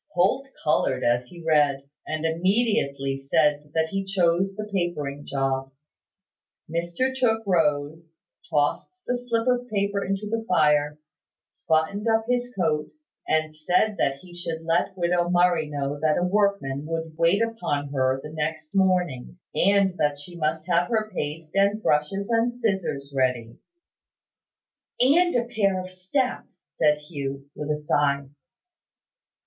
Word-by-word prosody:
Holt 195 Hz, +10 st, +2 dB, 0.2 s
coloured 150 Hz, -, +1 dB
as 120 Hz, +1 st, +1 dB
he 170 Hz, +2 st, -12 dB
read, 145 Hz, -3 st, +2 dB, 0.2 s
and 155 Hz, 0 st, -2 dB
immediately 165 Hz, -, +1 dB
said 150 Hz, +1 st, +1 dB
that 160 Hz, 0 st, +1 dB
he 195 Hz, +2 st, -2 dB
chose 190 Hz, 0 st, +1 dB
the 210 Hz, +1 st, -5 dB
papering 150 Hz, -6 st, -2 dB
job. 135 Hz, -1 st, -1 dB, 1.0 s
Mr 170 Hz, +11 st, -1 dB
Tooke 225 Hz, -4 st, +1 dB
rose, 160 Hz, -2 st, 0 dB, 0.3 s
tossed 145 Hz, -1 st, 0 dB
the 250 Hz, -, 0 dB
slip 240 Hz, -1 st, -1 dB
of 245 Hz, 0 st, +1 dB
paper 200 Hz, -1 st, 0 dB
into 195 Hz, +2 st, -2 dB
the 225 Hz, +1 st, -2 dB
fire, 150 Hz, -3 st, +3 dB, 0.7 s
buttoned 160 Hz, +7 st, +1 dB
up 225 Hz, 0 st, +2 dB
his 245 Hz, 0 st, 0 dB
coat, 155 Hz, -4 st, 0 dB, 0.4 s
and 155 Hz, 0 st, 0 dB
said 180 Hz, +7 st, +1 dB
that 135 Hz, -, +2 dB
he 180 Hz, -1 st, -14 dB
should 165 Hz, -2 st, -5 dB
let 170 Hz, +4 st, 0 dB
widow 175 Hz, 0 st, +1 dB
Murray 175 Hz, -3 st, +3 dB
know 145 Hz, 0 st, -3 dB
that 155 Hz, 0 st, +2 dB
a 175 Hz, -, +1 dB
workman 180 Hz, -8 st, 0 dB
would 165 Hz, -1 st, -4 dB
wait 170 Hz, +6 st, +3 dB
upon 150 Hz, -11 st, -2 dB
her 130 Hz, -1 st, +1 dB
the 150 Hz, -, -7 dB
next 155 Hz, 0 st, -3 dB
morning, 180 Hz, -8 st, +1 dB, 0.2 s
and 200 Hz, 0 st, +3 dB
that 145 Hz, -1 st, +1 dB
she 160 Hz, +5 st, -10 dB
must 155 Hz, -1 st, -1 dB
have 175 Hz, 0 st, +2 dB
her 215 Hz, -2 st, 0 dB
paste 155 Hz, -1 st, -4 dB
and 200 Hz, +2 st, +2 dB
brushes 150 Hz, +7 st, +1 dB
and 230 Hz, +1 st, +2 dB
scissors 190 Hz, -, -2 dB
ready. 125 Hz, -3 st, 0 dB, 1.4 s
"And 335 Hz, +7 st, +4 dB
a 240 Hz, -1 st, +2 dB
pair 200 Hz, -6 st, +1 dB
of 185 Hz, 0 st, -7 dB
steps," 190 Hz, +3 st, -2 dB
said 150 Hz, -1 st, +3 dB
Hugh, 140 Hz, -2 st, -6 dB
with 150 Hz, 0 st, -6 dB
a 150 Hz, -, +1 dB
sigh. 140 Hz, -2 st, 0 dB
170 Hz, 145 wpm, -25 LUFS, 150-200 Hz, 1.4 s, And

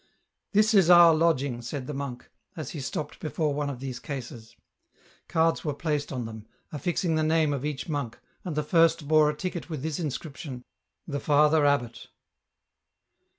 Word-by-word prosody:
" -, -, -52 dB
This 215 Hz, +2 st, +4 dB
is 190 Hz, -5 st, +5 dB
our 175 Hz, -2 st, +9 dB
lodging," 145 Hz, -6 st, +1 dB
said 130 Hz, +2 st, -5 dB
the 150 Hz, -, -5 dB
monk, 135 Hz, -3 st, -6 dB, 0.3 s
as 155 Hz, -5 st, -5 dB
he 155 Hz, -, -6 dB
stopped 145 Hz, +2 st, -5 dB
before 155 Hz, -1 st, -1 dB
one 145 Hz, 0 st, -2 dB
of 135 Hz, -3 st, -6 dB
these 130 Hz, -2 st, -5 dB
cases. 120 Hz, -6 st, -8 dB, 0.7 s
Cards 165 Hz, 0 st, +1 dB
were 150 Hz, -3 st, -2 dB
placed 150 Hz, -1 st, -2 dB
on 125 Hz, -3 st, -3 dB
them, 110 Hz, -1 st, -9 dB, 0.2 s
affixing 170 Hz, +2 st, -1 dB
the 155 Hz, -, +1 dB
name 155 Hz, -1 st, +2 dB
of 140 Hz, -2 st, -3 dB
each 150 Hz, -2 st, -4 dB
monk, 140 Hz, -7 st, -3 dB, 0.3 s
and 175 Hz, -5 st, -4 dB
the 150 Hz, -, 0 dB
first 165 Hz, -1 st, +3 dB
bore 155 Hz, -1 st, +5 dB
a 150 Hz, -, -3 dB
ticket 180 Hz, -1 st, -5 dB
with 155 Hz, -5 st, -5 dB
this 160 Hz, 0 st, -3 dB
inscription: 145 Hz, -4 st, -5 dB, 0.2 s
" -, -, -53 dB
The 145 Hz, -3 st, -3 dB
Father 150 Hz, +1 st, +4 dB
Abbot." 120 Hz, -5 st, -1 dB
150 Hz, 180 wpm, -27 LUFS, 135-160 Hz, 0.7 s, our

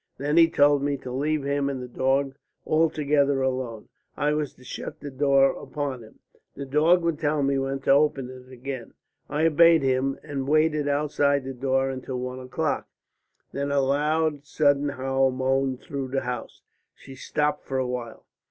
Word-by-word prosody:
Then 145 Hz, +3 st, -1 dB
he 165 Hz, -1 st, +7 dB
told 145 Hz, -2 st, +4 dB
me 140 Hz, 0 st, 0 dB
to 130 Hz, -1 st, -8 dB
leave 145 Hz, +3 st, -1 dB
him 140 Hz, 0 st, 0 dB
and 135 Hz, -2 st, -4 dB
the 125 Hz, -, -6 dB
dog 135 Hz, +2 st, 0 dB, 0.3 s
altogether 145 Hz, -3 st, +2 dB
alone. 130 Hz, -4 st, -3 dB, 0.3 s
I 150 Hz, +1 st, +1 dB
was 150 Hz, -2 st, -2 dB
to 125 Hz, -, -18 dB
shut 150 Hz, +4 st, -7 dB
the 145 Hz, -, -7 dB
door 135 Hz, 0 st, +4 dB
upon 140 Hz, -4 st, -5 dB
him. 110 Hz, -, -15 dB, 0.4 s
The 140 Hz, -, -6 dB
dog 160 Hz, +6 st, +3 dB
would 165 Hz, -2 st, 0 dB
tell 150 Hz, -2 st, 0 dB
me 135 Hz, 0 st, +1 dB
when 135 Hz, 0 st, -2 dB
to -, -, +2 dB
open 140 Hz, -2 st, +3 dB
it 130 Hz, 0 st, -13 dB
again. 130 Hz, -1 st, -7 dB, 0.3 s
I 155 Hz, +2 st, +1 dB
obeyed 165 Hz, 0 st, +5 dB
him 135 Hz, +1 st, +1 dB
and 135 Hz, -2 st, -4 dB
waited 155 Hz, 0 st, +2 dB
outside 145 Hz, -1 st, +1 dB
the 135 Hz, +1 st, -5 dB
door 135 Hz, +1 st, 0 dB
until 130 Hz, -1 st, -5 dB
one 125 Hz, +1 st, -5 dB
o'clock. 140 Hz, +4 st, -2 dB, 0.6 s
Then 140 Hz, +1 st, -3 dB
a 140 Hz, -, +2 dB
loud 150 Hz, +2 st, +1 dB
sudden 145 Hz, -1 st, +2 dB
howl 135 Hz, -1 st, +1 dB
moaned 130 Hz, 0 st, 0 dB
through 140 Hz, -5 st, -5 dB
the 135 Hz, +1 st, -1 dB
house." 125 Hz, -1 st, -6 dB, 0.3 s
She 135 Hz, -, -13 dB
stopped 150 Hz, +3 st, -1 dB
for 135 Hz, -, -2 dB
a 130 Hz, -, 0 dB
while. 125 Hz, -2 st, -6 dB
140 Hz, 180 wpm, -25 LUFS, 130-150 Hz, 0.6 s, he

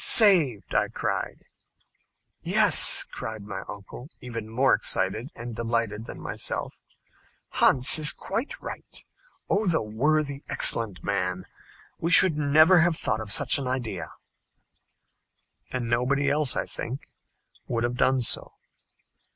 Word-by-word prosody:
"Saved!" 170 Hz, -, +4 dB
I -, -, +1 dB
cried. -, -, -5 dB, 1.0 s
"Yes," -, -, +4 dB
cried 110 Hz, -2 st, -7 dB
my 100 Hz, -, -7 dB
uncle, 105 Hz, +6 st, -11 dB
even 115 Hz, -3 st, -8 dB
more 125 Hz, +4 st, +2 dB
excited 115 Hz, +6 st, 0 dB
and 120 Hz, -1 st, -8 dB
delighted 115 Hz, -2 st, -3 dB
than -, -, -9 dB
myself; -, -, -5 dB, 0.8 s
"Hans 130 Hz, +3 st, +4 dB
is 150 Hz, -1 st, +7 dB
quite 225 Hz, +9 st, -6 dB
right. -, -, -9 dB, 0.4 s
Oh, 205 Hz, +1 st, -1 dB
the 160 Hz, -8 st, 0 dB
worthy, 140 Hz, +6 st, -1 dB
excellent 110 Hz, -5 st, +2 dB
man! 95 Hz, -2 st, -3 dB, 0.5 s
We 165 Hz, -, -2 dB
should 175 Hz, -1 st, +6 dB
never 155 Hz, +5 st, +4 dB
have 170 Hz, 0 st, +1 dB
thought 110 Hz, -, -1 dB
of 105 Hz, -2 st, -2 dB
such -, -, +5 dB
an 135 Hz, -, -5 dB
idea." 125 Hz, -3 st, -4 dB, 1.6 s
And 125 Hz, -2 st, -4 dB
nobody 125 Hz, +4 st, 0 dB
else, 150 Hz, -2 st, +3 dB
I -, -, -2 dB
think, 130 Hz, +4 st, -7 dB, 0.7 s
would 115 Hz, -1 st, -2 dB
have 120 Hz, 0 st, -2 dB
done 130 Hz, 0 st, +1 dB
so. 115 Hz, -, -1 dB
125 Hz, 125 wpm, -25 LUFS, 115-150 Hz, 1.6 s, is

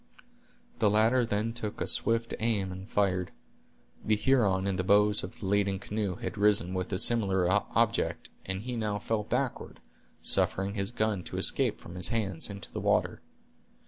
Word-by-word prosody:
The 105 Hz, -, +4 dB
latter 115 Hz, +4 st, +3 dB
then 110 Hz, +2 st, -1 dB
took 110 Hz, -3 st, -5 dB
a -, -, -1 dB
swift 115 Hz, 0 st, +2 dB
aim 105 Hz, -4 st, 0 dB
and 95 Hz, +2 st, -9 dB
fired. 95 Hz, -3 st, 0 dB, 0.7 s
The 110 Hz, -, +2 dB
Huron 105 Hz, -6 st, +2 dB
in 95 Hz, -1 st, -1 dB
the 95 Hz, -, -1 dB
bows 105 Hz, +2 st, +3 dB
of -, -, -8 dB
the -, -, -6 dB
leading 100 Hz, 0 st, +1 dB
canoe 100 Hz, -1 st, -3 dB
had -, -, -6 dB
risen 100 Hz, -4 st, +3 dB
with 90 Hz, 0 st, -3 dB
a 95 Hz, -, 0 dB
similar 100 Hz, -4 st, +2 dB
object, 105 Hz, +3 st, 0 dB
and 95 Hz, +1 st, -4 dB
he 125 Hz, 0 st, -4 dB
now 105 Hz, -3 st, -2 dB
fell 110 Hz, +1 st, -1 dB
backward, -, -, -3 dB, 0.4 s
suffering 95 Hz, +1 st, +2 dB
his 100 Hz, -1 st, -2 dB
gun 110 Hz, -4 st, -1 dB
to -, -, -6 dB
escape -, -, +2 dB
from 85 Hz, -, -11 dB
his 90 Hz, 0 st, 0 dB
hands 100 Hz, -7 st, -1 dB
into 100 Hz, -1 st, -8 dB
the -, -, -5 dB
water. -, -, +1 dB
105 Hz, 175 wpm, -29 LUFS, 95-110 Hz, 0.7 s, The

